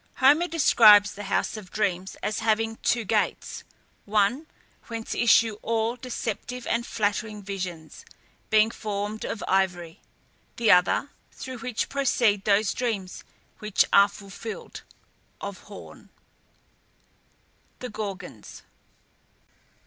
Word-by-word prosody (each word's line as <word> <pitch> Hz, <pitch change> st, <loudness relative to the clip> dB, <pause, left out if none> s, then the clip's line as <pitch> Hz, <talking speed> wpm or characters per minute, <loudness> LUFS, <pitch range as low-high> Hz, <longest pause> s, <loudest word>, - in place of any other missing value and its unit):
Homer 295 Hz, +6 st, +4 dB
describes 215 Hz, -11 st, +6 dB
the 205 Hz, 0 st, -8 dB
House 200 Hz, -, -1 dB
of 200 Hz, -4 st, -10 dB
Dreams 190 Hz, -2 st, -2 dB
as 210 Hz, -, -1 dB
having 225 Hz, 0 st, 0 dB
two 240 Hz, -2 st, 0 dB
gates: 210 Hz, +1 st, -1 dB, 0.4 s
one, 215 Hz, +9 st, +1 dB, 0.4 s
whence 230 Hz, -1 st, -5 dB
issue 225 Hz, -2 st, +3 dB
all 225 Hz, +1 st, -1 dB
deceptive 250 Hz, -1 st, -5 dB
and 235 Hz, 0 st, -1 dB
flattering 210 Hz, 0 st, -2 dB
visions, 180 Hz, -5 st, -6 dB, 0.5 s
being 215 Hz, +1 st, +4 dB
formed 210 Hz, -1 st, -4 dB
of 225 Hz, -, -4 dB
ivory; 180 Hz, -3 st, 0 dB, 0.5 s
the 230 Hz, -2 st, +3 dB
other, 180 Hz, +10 st, +3 dB, 0.2 s
through 260 Hz, -2 st, -8 dB
which 235 Hz, -1 st, -3 dB
proceed 240 Hz, -7 st, +1 dB
those 205 Hz, 0 st, +3 dB
dreams 210 Hz, -7 st, -3 dB, 0.4 s
which 210 Hz, -2 st, +2 dB
are 200 Hz, 0 st, +7 dB
fulfilled, 200 Hz, +2 st, -9 dB, 0.6 s
of -, -, -6 dB
horn. -, -, -12 dB, 1.7 s
THE 250 Hz, -, -7 dB
GORGONS. 195 Hz, -, -7 dB
215 Hz, 110 wpm, -26 LUFS, 200-230 Hz, 1.7 s, are